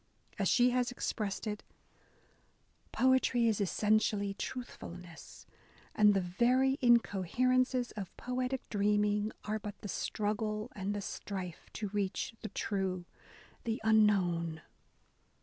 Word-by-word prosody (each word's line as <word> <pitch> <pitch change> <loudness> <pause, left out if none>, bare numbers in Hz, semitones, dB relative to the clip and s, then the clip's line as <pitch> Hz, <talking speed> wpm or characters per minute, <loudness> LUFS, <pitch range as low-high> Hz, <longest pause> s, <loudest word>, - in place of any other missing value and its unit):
As - - +2
she 245 0 +5
has 250 0 +1
expressed 215 -5 -3
it, 210 -1 -3 1.3
Poetry 255 -2 +3
is 220 -2 +1
essentially 205 0 +1
truthfulness, 180 -8 -8 0.5
and 210 -1 +5
the 195 - +3
very 250 +9 +2
incoherences 245 +2 +2
of 195 -4 -7
poetic 250 +1 -3
dreaming 210 0 +1
are 215 +1 -1
but 205 -1 -7
the - - -6
struggle 215 +3 -2
and 200 +1 -2
the 205 - -3
strife 190 -3 -6
to 210 -2 -3
reach 200 +1 -2
the 215 - -5
true 190 -3 -2 0.3
— - - -24
the 225 -1 -1
unknown." 185 -7 +3
210 Hz, 115 wpm, -33 LUFS, 195-240 Hz, 1.3 s, she